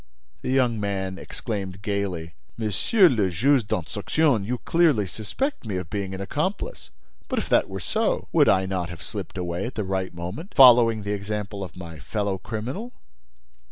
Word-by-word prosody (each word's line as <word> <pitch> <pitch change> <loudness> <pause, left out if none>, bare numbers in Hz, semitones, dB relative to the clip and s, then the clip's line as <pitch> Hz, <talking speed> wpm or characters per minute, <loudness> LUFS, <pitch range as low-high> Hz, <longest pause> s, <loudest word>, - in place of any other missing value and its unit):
The - - -4
young 125 -4 +2
man 95 -2 -2
exclaimed, 95 -4 -5
gaily: 95 -6 -2 0.2
"Monsieur 115 - +4
le 110 - +2
Juge 120 - +2
d'Instruction, 105 - +1
you 125 +5 -2
clearly 155 - +3
suspect 110 - -3
me 105 -5 -4
of 90 -2 -4
being 100 -2 -3
an 95 - -6
accomplice. 155 - -3 0.4
But, - - -2
if - - -1
that - - +3
were - - -5
so, - - 0
would - - +5
I 95 0 +4
not 95 -2 -2
have 85 0 -9
slipped 100 -2 -6
away 90 +3 -2
at 125 - -8
the 105 - -1
right 95 -1 -2
moment, 90 - -7
following 120 -5 +7
the 100 +1 -2
example 100 0 -4
of 90 -2 -9
my 85 -3 -8
fellow 100 - -2
criminal?" 125 - -5
100 Hz, 170 wpm, -25 LUFS, 95-120 Hz, 0.4 s, following